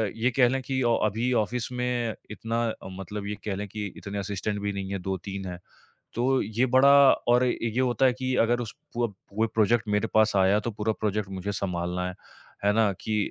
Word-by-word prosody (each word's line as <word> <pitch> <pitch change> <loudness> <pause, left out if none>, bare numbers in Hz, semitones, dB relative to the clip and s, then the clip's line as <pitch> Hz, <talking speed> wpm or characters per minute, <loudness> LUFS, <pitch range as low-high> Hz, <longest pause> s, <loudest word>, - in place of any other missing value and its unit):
ये 120 +3 +1
कह 125 -2 +6
लें 135 +1 -1
कि 130 +1 -2
ऑ 120 -1 +3
अभी 115 +5 -1
ऑफ़िस 120 +2 -2
में 125 -2 -1 0.2
इतना 115 +2 -2 0.3
मतलब 100 +2 -6
ये 105 - -3
कह 100 -2 -1
लें 105 +1 -4
कि 105 0 -4
इतने 100 0 -6
असिस्टेंट 100 +1 -3
भी 100 0 -2
नहीं 100 0 -4
है, 100 - -2
2-3 95 +1 -4
हैं। 90 0 -6 0.6
तो 130 +3 +2
ये 110 +5 0
बड़ा 135 +2 +7 0.4
और 120 +1 +5
ये 115 0 -1
होता 125 +1 +2
है 125 - +2
कि 130 0 -2
अगर 120 +1 +1
उस 115 - -6 0.2
वो 120 -1 +2 0.3
वो 110 +2 +1
प्रोजेक्ट 110 +1 +3
मेरे 105 +2 +1
पास 110 -1 +4
आया 95 +2 +4
तो 115 - -3
पूरा 110 +1 -1
प्रोजेक्ट 105 -1 -1
मुझे 95 +1 -4
सँभालना 90 -1 -2
है। 90 - -5 0.5
है 105 - +4
ना। 110 -2 +3
कि 110 -1 -1
110 Hz, 205 wpm, -27 LUFS, 100-120 Hz, 0.6 s, बड़ा